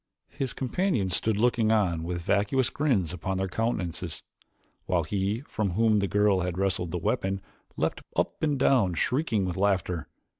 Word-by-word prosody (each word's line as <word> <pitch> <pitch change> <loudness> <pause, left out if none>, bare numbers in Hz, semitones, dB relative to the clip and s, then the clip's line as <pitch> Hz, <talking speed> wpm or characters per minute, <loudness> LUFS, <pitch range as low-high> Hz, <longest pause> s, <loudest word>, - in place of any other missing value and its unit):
His 135 -2 -2
companions 130 - 0
stood 110 +1 +1
looking 115 -1 +2
on 95 -7 +2
with 85 +1 -4
vacuous 105 +8 +1
grins 105 - +1
upon 95 +2 -3
their 95 0 0
countenances, 90 -6 -3 0.6
while 90 -3 +2
he 100 +7 -1
from 105 -9 -2
whom 110 +1 +3
the 100 - 0
girl 105 +1 +3
had 90 -1 -2
wrested 95 -3 +1
the 90 - -2
weapon 95 +3 -1 0.4
leaped - - -1
up - - -1
and 150 -3 +1
down 120 -9 +3
shrieking 115 - +1
with 90 -1 -3
laughter. 95 -4 0
100 Hz, 160 wpm, -27 LUFS, 90-115 Hz, 0.6 s, whom